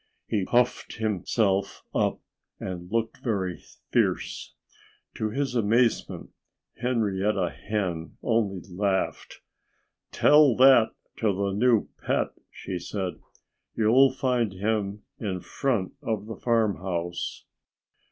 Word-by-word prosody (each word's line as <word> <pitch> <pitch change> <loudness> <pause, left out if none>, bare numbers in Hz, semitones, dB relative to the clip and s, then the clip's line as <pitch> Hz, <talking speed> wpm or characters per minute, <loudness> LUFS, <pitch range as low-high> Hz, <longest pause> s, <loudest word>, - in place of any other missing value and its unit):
He 100 -4 -1
puffed 125 +2 +1
himself 105 -1 0
up - - 0 0.4
and 90 0 -6
looked 115 0 -1
very 95 -7 -1 0.3
fierce. - - 0 0.6
To 110 - -2
his 135 +2 -2
amazement, 115 +1 +1 0.5
Henrietta 105 -6 0
Hen 90 -6 -3
only 105 -6 0
laughed. 95 +1 -2 0.7
"Tell 150 -4 +6
that 130 -3 +6 0.2
to 110 -2 +2
the 100 +1 -1
new 115 +2 +3 0.2
pet!" - - +1 0.2
she 95 -2 -6
said. 95 -1 -4 0.6
"You'll 120 +5 +5
find 125 -5 0
him 105 +1 -2 0.2
in 95 -5 -2
front 115 -1 -1
of 110 -3 -2
the 110 0 -6
farmhouse." 95 -7 -1
105 Hz, 105 wpm, -26 LUFS, 95-115 Hz, 0.7 s, Tell